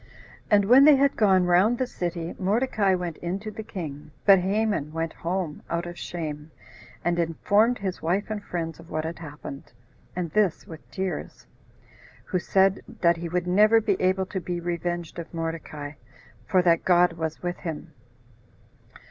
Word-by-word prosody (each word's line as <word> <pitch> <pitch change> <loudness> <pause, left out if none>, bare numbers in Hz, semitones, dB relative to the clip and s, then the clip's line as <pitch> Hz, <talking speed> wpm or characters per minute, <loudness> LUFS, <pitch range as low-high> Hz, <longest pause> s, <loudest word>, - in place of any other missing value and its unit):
And 205 -1 +4
when 255 +6 +7
they 300 -1 +8
had 275 +1 +2
gone 190 -4 +4
round 185 +7 +4
the 255 - 0
city, 175 -6 -4
Mordecai 205 -1 +2
went 175 -3 -4
in 175 +2 -3
to 215 0 -6
the 220 - -7
king; 155 -8 -7 0.2
but 195 -2 +8
Haman 195 -5 0
went 165 0 -2
home, 170 -3 -3
out 170 +1 -1
of 175 0 -7
shame, 155 -4 -6 0.6
and 175 0 +1
informed 205 +8 +2
his 190 -2 -4
wife 190 +6 -1
and 210 -1 -4
friends 165 -2 -4
of 165 0 -14
what 155 - -2
had 165 +1 -5
happened, 150 -5 -9 0.4
and 175 -3 -3
this 210 -5 +1
with 160 -1 -12
tears; 190 -1 -5 0.8
who 185 - -1
said, 195 +2 +2 0.2
that 170 -1 +4
he 170 0 -5
would 180 +1 -1
never 210 +5 +5
be 210 -3 +1
able 185 +1 +2
to 190 0 -4
be 175 +1 -3
revenged 175 0 -3
of 170 - -8
Mordecai, 160 -3 -5 0.6
for 185 -1 +3
that 170 -2 +3
God 180 -1 +4
was 160 0 -4
with 175 0 -2
him. 160 -3 -6
175 Hz, 170 wpm, -26 LUFS, 165-195 Hz, 0.8 s, they